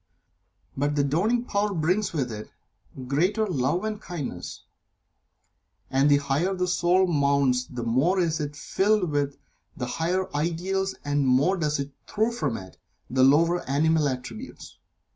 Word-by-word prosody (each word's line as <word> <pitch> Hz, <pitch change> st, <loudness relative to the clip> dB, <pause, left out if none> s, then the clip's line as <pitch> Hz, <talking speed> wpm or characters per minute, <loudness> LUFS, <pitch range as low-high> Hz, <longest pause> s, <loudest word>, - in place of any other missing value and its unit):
But 145 Hz, +2 st, 0 dB
the 145 Hz, -, +2 dB
dawning 205 Hz, -, +1 dB
power 205 Hz, -3 st, 0 dB
brings 180 Hz, +6 st, +1 dB
with 135 Hz, -7 st, -2 dB
it 105 Hz, -1 st, -7 dB, 0.6 s
greater 180 Hz, -, +1 dB
Love 170 Hz, 0 st, 0 dB
and 215 Hz, -1 st, -3 dB
Kindness, 170 Hz, -9 st, -6 dB, 1.3 s
and 135 Hz, +2 st, +3 dB
the 145 Hz, -, +6 dB
higher 145 Hz, +7 st, 0 dB
the 180 Hz, 0 st, 0 dB
soul 180 Hz, +1 st, +3 dB
mounts 140 Hz, -6 st, +2 dB
the 125 Hz, -1 st, -6 dB
more 135 Hz, +12 st, +2 dB
is 165 Hz, -3 st, +1 dB
it 145 Hz, -1 st, -4 dB
filled 195 Hz, +1 st, +1 dB
with 145 Hz, -1 st, -1 dB, 0.4 s
the 125 Hz, -, -2 dB
higher 170 Hz, +6 st, -2 dB
ideals 180 Hz, +5 st, -1 dB
and 145 Hz, 0 st, 0 dB
the 140 Hz, -, +1 dB
more 135 Hz, +9 st, +3 dB
does 150 Hz, -4 st, 0 dB
it 140 Hz, 0 st, -4 dB, 0.2 s
throw 220 Hz, +2 st, 0 dB
from 140 Hz, -, -2 dB
it 95 Hz, -1 st, -11 dB, 0.3 s
the 130 Hz, +1 st, +2 dB
lower 165 Hz, +6 st, +4 dB
animal 155 Hz, +2 st, +2 dB
attributes. 130 Hz, -, -8 dB
155 Hz, 150 wpm, -26 LUFS, 140-185 Hz, 1.3 s, the